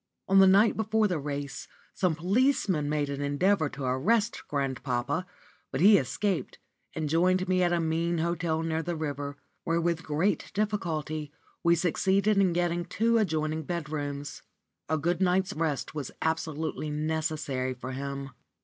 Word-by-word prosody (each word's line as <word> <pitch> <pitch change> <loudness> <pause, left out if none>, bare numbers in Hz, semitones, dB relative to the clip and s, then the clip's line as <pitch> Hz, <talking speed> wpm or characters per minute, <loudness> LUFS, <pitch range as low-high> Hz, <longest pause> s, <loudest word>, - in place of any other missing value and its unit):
On 195 0 +5
the 190 - +8
night 200 +4 +5
before 220 0 +2
the 180 -5 -1
race 140 -1 -5 0.3
some 180 -4 +1
policemen 185 - +1
made 150 -1 0
an 140 0 -4
endeavour 155 +4 +2
to 140 - -7
arrest 205 - +1
grandpapa, 140 +3 -2 0.4
but 130 - -2
he 200 +3 +7
escaped, 180 +9 -2 0.4
and 155 -1 -2
joined 185 +4 +2
me 185 0 +2
at 175 -1 +3
a 175 - +2
mean 165 +1 0
hotel 165 -1 0
near 160 0 -1
the 175 +1 -3
river, 145 -2 -4 0.3
where 165 0 +1
with 170 -1 0
great 160 +7 0
difficulty 160 -8 -2 0.3
we 170 0 +5
succeeded 195 +4 +2
in 190 -2 +4
getting 175 0 0
two 230 +6 +1
adjoining 155 -5 0
bedrooms. 145 -3 -4 0.5
A 160 - +2
good 170 +4 0
night's 185 0 +2
rest 155 -3 -2
was 145 -4 -4
absolutely 160 -1 -2
necessary 150 -4 -2
for 130 +1 -6
him. 140 0 -5
160 Hz, 150 wpm, -28 LUFS, 145-185 Hz, 0.5 s, the